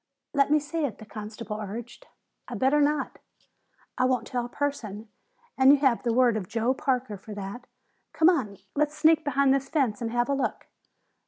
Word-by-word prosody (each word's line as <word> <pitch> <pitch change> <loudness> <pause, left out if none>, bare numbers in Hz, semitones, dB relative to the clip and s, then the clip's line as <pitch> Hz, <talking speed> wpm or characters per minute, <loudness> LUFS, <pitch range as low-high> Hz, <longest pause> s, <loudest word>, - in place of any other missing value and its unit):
"Let 280 -1 +3
me 305 - +5
see 300 +2 -3
it," 255 -8 -2
the 220 - -11
constable 215 0 -7
urged. 235 - -8 0.4
"I'd - - -5
better 275 +3 +3
not." 290 -1 0 0.8
"I 255 - +4
won't 255 -3 +1
tell 245 -1 -2
a 240 - -6
person, 225 -7 -4 0.5
and 265 +1 +8
you 290 - +6
have 265 -4 +2
the 235 - 0
word 240 -1 +4
of 190 -4 -5
Joe 230 +3 +1
Parker 255 -5 -1
for 210 +2 -10
that. 205 +5 -7 0.4
Come 320 - +3
on. 250 - +2 0.2
Let's 300 +1 0
sneak 320 0 +4
behind 280 -1 +3
this 275 0 -1
fence 250 -9 0
and 230 - -1
have 240 +1 0
a 280 - +1
look." 275 - -2
255 Hz, 190 wpm, -27 LUFS, 225-285 Hz, 0.8 s, and